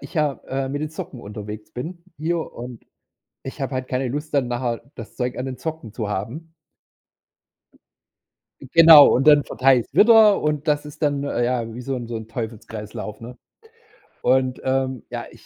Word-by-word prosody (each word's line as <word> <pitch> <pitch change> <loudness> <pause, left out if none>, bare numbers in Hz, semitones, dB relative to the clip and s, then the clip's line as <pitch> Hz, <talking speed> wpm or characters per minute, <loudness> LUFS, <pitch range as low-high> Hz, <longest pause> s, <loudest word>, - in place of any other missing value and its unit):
ich - - -12
ja, 150 -3 0
äh, 135 0 -2
mit 145 +1 -3
den 155 - -2
Socken 135 -5 -8
unterwegs 105 0 -8
bin 170 +8 -7
hier, 165 +3 -1
und 120 -1 -9 0.6
ich 135 +2 -8
habe 135 0 -3
halt 130 0 -3
keine 130 0 -1
Lust 150 +5 -5
dann 140 -4 +1
nachher 120 -1 -2
das 115 - -10
Zeug 125 -1 -3
an 130 - -3
den 130 -1 -5
Socken 160 -9 -6
zu 110 -4 -4
haben. 135 +12 -5 2.1
Genau 160 +1 +8
und 135 +4 +1
dann 145 -1 +7
verteile 130 -1 +3
ich's - - -11
wieder, 220 -2 +6
und 150 0 -2
das 150 0 +1
ist 150 +2 -12
dann 145 -1 +1
ja 120 -3 -1
wie 125 - -7
so 135 +2 -3
'n 120 -2 -6
so 115 -1 -5
'n 110 0 -8
Teufelskreislauf, 110 -2 -7
ne? 120 +2 -10 0.9
Und, 130 -1 +1
ähm, 130 -2 -1
ja, - - -5
ich - - -18
130 Hz, 180 wpm, -22 LUFS, 120-150 Hz, 2.1 s, Genau